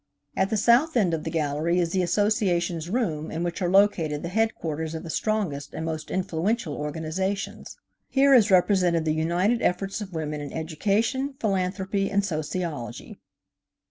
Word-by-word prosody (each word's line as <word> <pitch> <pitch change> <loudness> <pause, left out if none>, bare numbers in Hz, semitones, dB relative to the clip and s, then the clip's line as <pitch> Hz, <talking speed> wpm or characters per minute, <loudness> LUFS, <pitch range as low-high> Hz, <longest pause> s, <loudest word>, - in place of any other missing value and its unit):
At 190 - +1
the 220 - 0
south 245 +8 +4
end 190 -7 +2
of 160 - -2
the - - -1
gallery 155 +1 0
is 170 -2 +1
the 185 - +1
Associations' 175 -4 +1
room 180 -9 -1
in 165 +2 -3
which 175 +3 -3
are 175 - +1
located 175 -6 +3
the 170 - -3
headquarters 165 -7 -1
of 160 - -5
the 165 - -5
strongest 170 -11 -2
and 160 - -3
most 160 -1 -4
influential 185 0 -1
organizations. 160 - -4 0.3
Here 275 0 +4
is 225 -4 +6
represented 180 -3 +3
the 155 - +2
united 175 +9 +1
efforts 195 +3 -1
of 195 -2 -6
women 155 -3 -3
in 145 - -6
education, 210 - -1
philanthropy 195 0 -1
and 200 0 +1
sociology. 155 -7 -4
180 Hz, 160 wpm, -25 LUFS, 160-205 Hz, 0.3 s, is